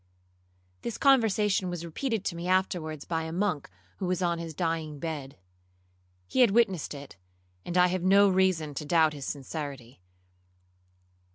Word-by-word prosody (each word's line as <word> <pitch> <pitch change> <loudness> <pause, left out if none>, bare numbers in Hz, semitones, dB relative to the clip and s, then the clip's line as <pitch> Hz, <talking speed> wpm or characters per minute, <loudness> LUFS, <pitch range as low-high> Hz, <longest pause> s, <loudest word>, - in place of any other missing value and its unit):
'This 235 - -4
conversation 215 -8 +3
was 175 -1 -5
repeated 220 - -3
to 170 - -2
me 170 +1 -5
afterwards 175 -5 0
by 165 -1 -1
a 160 0 -5
monk 180 -4 -1 0.3
who 185 - -3
was 180 0 0
on 170 -2 0
his 165 -2 -6
dying 165 -3 -2
bed. 145 - -5 0.9
He 260 - +1
had 245 - +7
witnessed 195 -8 +1
it, 140 0 -10 0.5
and 175 - -2
I 180 - +7
have 180 0 0
no 200 +2 +6
reason 185 -5 +2
to 150 - -4
doubt 160 0 +3
his 140 -2 -7
sincerity. 140 - -6
170 Hz, 155 wpm, -28 LUFS, 155-190 Hz, 0.9 s, had